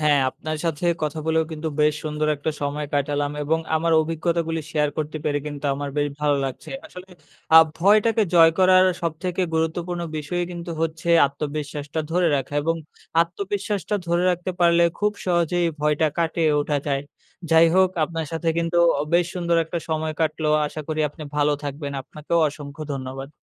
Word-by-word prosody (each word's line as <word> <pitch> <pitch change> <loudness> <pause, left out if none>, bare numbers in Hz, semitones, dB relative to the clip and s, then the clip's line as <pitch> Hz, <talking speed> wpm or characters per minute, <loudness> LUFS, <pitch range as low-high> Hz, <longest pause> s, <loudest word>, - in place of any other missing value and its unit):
হ্যাঁ, 150 -2 +4
আপনার 155 +3 -5
সাথে 165 0 -2 0.2
কথা 155 +1 -2
বলেও 160 0 +2
কিন্তু 160 +1 -3
বেশ 150 0 +4
সুন্দর 155 0 -1
একটা 145 +3 -2
সময় 145 +1 -2
কাটালাম 145 0 0
এবং 160 +3 +1 0.2
আমার 165 +1 +1
অভিজ্ঞতাগুলি 165 0 -1
শেয়ার 150 -1 +2
করতে 155 0 -3
পেরে 145 -1 +1
কিন্তু 145 -1 -6
আমার 145 +1 -4
বেশ 145 0 +1
ভালো 145 -1 +2
লাগছে। 130 -1 -6 0.2
আসলে 180 +1 -12 0.5
আ - - +11 0.2
ভয়টাকে 215 +5 +4
জয় 165 -1 +8
করার 185 0 +6 0.2
সবথেকে 170 +3 -2
গুরুত্বপূর্ণ 170 +2 -1
বিষয়ই 165 +4 -2
কিন্তু 170 0 -6
হচ্ছে 165 +1 -3 0.2
আত্মবিশ্বাসটা 145 +1 -4
ধরে 175 +1 +2
রাখা 135 +1 -4
এবং 165 +2 0 0.5
আত্মবিশ্বাসটা 200 +3 -3
ধরে 170 +1 +1
রাখতে 180 +1 -2
পারলে 170 0 +5 0.2
খুব 210 0 +1
সহজেই 175 -1 +2
ভয়টা 150 +1 +2
কাটিয়ে 165 -1 +1
ওঠা 145 0 0
যায়। 140 -1 0 0.5
যাই 165 +1 +7
হোক, 190 0 +5 0.2
আপনার 165 0 -4
সাথে 165 +1 -2
কিন্তু 170 +1 0 0.2
অ - - +1
বেশ 175 0 +4
সুন্দর 170 -1 0
একটা 165 +2 -4
সময় 160 0 -1
কাটলো। 155 -1 0 0.2
আশা 155 - -6
করি 155 0 -1
আপনি 150 +2 -11
ভালো 150 0 +3
থাকবেন, 145 0 -5
আপনাকেও 155 +5 -2
অসংখ্য 145 0 -9
ধন্যবাদ। 135 0 -6
160 Hz, 165 wpm, -23 LUFS, 150-170 Hz, 0.5 s, আ